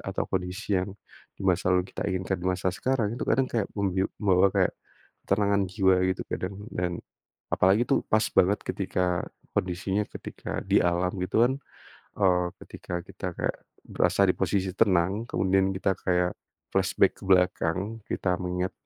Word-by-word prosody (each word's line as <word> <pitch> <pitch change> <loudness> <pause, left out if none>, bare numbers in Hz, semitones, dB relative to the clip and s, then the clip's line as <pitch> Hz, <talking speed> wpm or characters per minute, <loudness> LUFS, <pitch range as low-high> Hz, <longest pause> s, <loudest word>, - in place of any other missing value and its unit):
atau - - -1
kondisi 95 +1 -1
yang, 95 - -3 0.5
di 100 - -7
masa 90 -1 +2
lalu 90 0 +3
kita - - -2
inginkan 95 -1 -2
di 90 - -1
masa 90 0 0
sekarang 115 -1 0
itu 120 - -3
kadang 135 - +3
kayak 110 -4 0
membiu 95 -2 0
membawa 95 -2 +4
kayak, - - +3 0.6
ketenangan 100 0 +2
jiwa 95 0 +3
gitu 95 - -1
kadang 95 +2 -3 0.2
dan, 90 -1 -1 0.6
apalagi 95 +6 +4
tuh - - +2
pas 110 0 +3
banget 100 +3 +3
ketika, 90 -1 -1 0.3
kondisinya 95 +3 -1
ketika - - -6
di - - +3
alam 90 +1 +1
gitu 100 +5 +3
kan, 125 - +2 0.7
eee, 90 -3 +3 0.2
ketika - - -10
kita 95 +1 -8
kayak, - - -2 0.3
berasa - - +1
di - - +1
posisi 95 -2 0
tenang 100 +1 +2
kemudian 95 -3 +1
kita 95 0 0
kayak, 90 0 +2 0.4
flashback - - +2
ke - - -10
belakang 90 +3 +2
kita 90 - 0
mengingat, 90 0 -2
95 Hz, 155 wpm, -27 LUFS, 90-100 Hz, 0.7 s, membawa